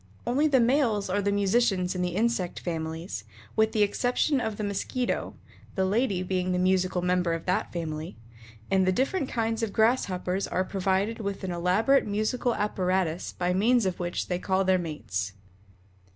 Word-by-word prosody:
Only 280 +6 +2
the 275 -3 +4
males 235 -6 +2
are 205 +2 +1
the 200 0 +1
musicians 200 -2 +2
in 180 - -3
the 180 -1 -1
insect 215 -4 0
families 160 - -4 0.3
with 220 0 +3
the 215 - +3
exception 250 +6 +1
of 220 -3 -3
the 215 - -3
Mosquito, 210 +5 -2 0.4
the 190 - +1
lady 200 -2 +1
being 185 0 -1
the - - +1
musical 185 0 +1
member 180 -1 +1
of 165 0 -4
that 185 - 0
family 160 -2 -5 0.5
and 190 -1 +3
the - - +4
different 270 - 0
kinds 225 -1 -1
of 225 -2 -1
Grasshoppers 195 -5 +1
are 185 - 0
provided 195 +3 0
with 200 -2 -4
an 185 - -2
elaborate 185 +11 +2
musical 215 +4 0
apparatus 185 -4 -1
by 180 0 0
means 225 +4 +3
of 185 -1 -2
which 175 0 -2
they 180 -1 -2
call 190 +1 +1
their 185 0 +3
mates. 100 - -4
190 Hz, 170 wpm, -27 LUFS, 180-220 Hz, 0.5 s, the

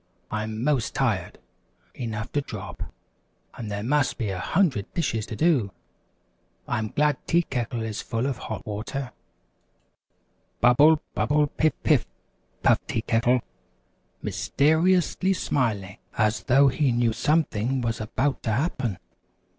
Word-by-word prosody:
I'm 110 +1 -3
'most 140 -4 +1
tired - - 0 0.6
enough 115 -2 -5
to 145 - +1
drop, - - -8 0.7
and 110 -3 -6
there 100 0 -3
must 135 +2 +1
be 110 -4 -2
a 95 - -4
hundred 155 - +1
dishes 115 -10 -1
to - - -5
do! 140 - +2 1.0
I'm 110 0 -1
glad 150 +6 +1
Tea 170 +1 +3
Kettle 120 -4 -3
is 110 -1 -4
full 115 +1 -2
of 135 -3 -2
hot 110 - -6
water." 120 +5 -4 1.5
"Bubble! 145 +6 +5
Bubble! 150 +1 +2
Piff! 155 +2 +1
Piff!" - - +3 0.6
puffed - - +3
Tea 110 - -1
Kettle, 120 +2 +2 0.8
mys - - -4
ter 150 +4 +5
i 185 - +6
ous 180 - 0
ly 190 +1 +3
smiling 110 - -1 0.2
as 110 0 +1
though 135 +2 +5
he 135 0 +1
knew 120 -1 +2
something 135 -4 +1
was 115 -1 -2
about 130 +6 -1
to 110 - -1
happen. 125 - -1
125 Hz, 140 wpm, -25 LUFS, 110-145 Hz, 1.5 s, i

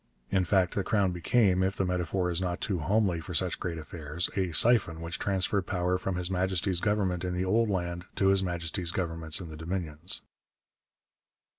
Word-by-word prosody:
In 95 -2 +2
fact 90 0 +2
the 100 - 0
Crown 100 -3 +2
became, 95 +2 +2
if 95 +1 +1
the 95 - 0
metaphor 90 0 0
is 85 +1 +1
not 90 -1 -2
too 95 -4 -1
homely 95 +1 +1
for 75 - -6
such - - 0
great 85 -2 -3
affairs, 80 +1 -3
a 95 -3 0
siphon 90 -2 +4
which 85 +1 -5
transferred 95 0 0
power 90 -1 0
from 95 0 -2
His 90 +1 -2
Majesty's 95 0 0
Government 95 -4 0
in 90 -1 -2
the 90 +1 0
old 110 +4 +2
land 90 -2 -2
to 95 - +3
His 95 0 +4
Majesty's 85 -1 -2
Governments 80 -2 -1
in 90 -3 -7
the 80 - -8
Dominions. 85 +1 -3
90 Hz, 185 wpm, -29 LUFS, 85-95 Hz, -, siphon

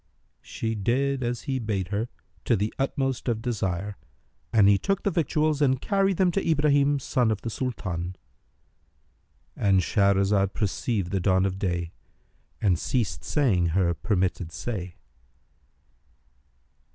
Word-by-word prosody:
She 115 0 -4
did 130 +6 0
as 120 -1 -2
he 135 -1 -2
bade 105 -5 -2
her, 105 +4 -2 0.4
to 120 - +3
the 105 +1 -1
utmost 135 -2 -1
of 115 -3 0
desire; 100 -4 -2 0.5
and 105 -4 +5
he 100 -1 +5
took 195 - -1
the 200 - +1
victuals 155 -2 +1
and 130 -3 +3
carried 195 0 +1
them 185 -2 +3
to 195 - -1
Ibrahim 145 -2 +3
son 125 -3 +1
of 110 -2 -1
the 115 - -3
Sultan.—And 95 - -5
Shahrazad 100 +1 +2
perceived 100 -2 -1
the 95 - +1
dawn 95 0 +2
of 95 0 -2
day 85 -3 -2 0.7
and 90 -5 +2
ceased 115 -5 -1
saying 105 - +2
her 85 +1 +2
permitted 90 -3 -1
say. 95 -4 -5
105 Hz, 130 wpm, -26 LUFS, 95-135 Hz, 0.7 s, and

